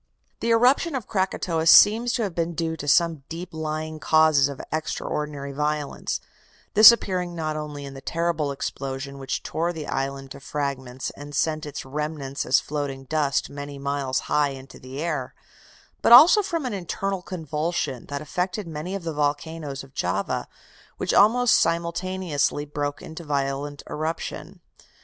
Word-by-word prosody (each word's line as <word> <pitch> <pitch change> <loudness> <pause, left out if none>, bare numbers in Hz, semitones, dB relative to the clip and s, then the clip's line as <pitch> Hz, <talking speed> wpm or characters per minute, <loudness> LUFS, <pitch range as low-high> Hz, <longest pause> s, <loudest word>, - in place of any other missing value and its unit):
The 230 - -1
eruption 255 +7 +4
of 255 - -3
Krakatoa 180 -4 -1
seems 225 +7 +7
to 235 - 0
have 195 -4 -3
been 170 0 -2
due 160 0 -1
to 145 -2 -7
some 165 0 +3
deep 170 +2 -6
lying 155 0 -4
causes 155 -1 +4
of 140 - -7
extraordinary 150 -2 -3
violence, 150 0 -2 0.5
this 215 +2 +11
appearing 180 -6 -2
not 155 -2 -2
only 150 -2 -5
in 140 - -8
the 135 - -9
terrible 165 -3 -1
explosion 135 0 -5
which 135 - -3
tore 170 +2 -1
the 160 -3 -6
island 135 0 -3
to - - -8
fragments 135 -3 -4
and 145 0 -9
sent 155 +1 0
its 145 -2 -6
remnants 145 0 -4
as 130 - +5
floating 140 -2 -4
dust 145 0 0
many 145 0 -7
miles 140 -1 -1
high 150 -1 +1
into 135 0 -10
the 130 +2 -8
air, 155 -6 -3 0.7
but - - +3
also 325 - +10
from 335 -7 -3
an 245 - -2
internal 195 +1 -3
convulsion 155 -6 -3
that 145 +1 -4
affected 180 +4 -3
many 165 +4 -5
of 195 - -5
the 165 -1 -3
volcanoes 145 -1 -2
of 135 0 -16
Java, 95 -1 -1 0.5
which - - -1
almost 240 +4 +5
simultaneously 170 -3 0
broke 145 0 -4
into 160 +2 -8
violent 140 -1 -2
eruption. 160 +2 -5
150 Hz, 155 wpm, -24 LUFS, 140-170 Hz, 0.7 s, this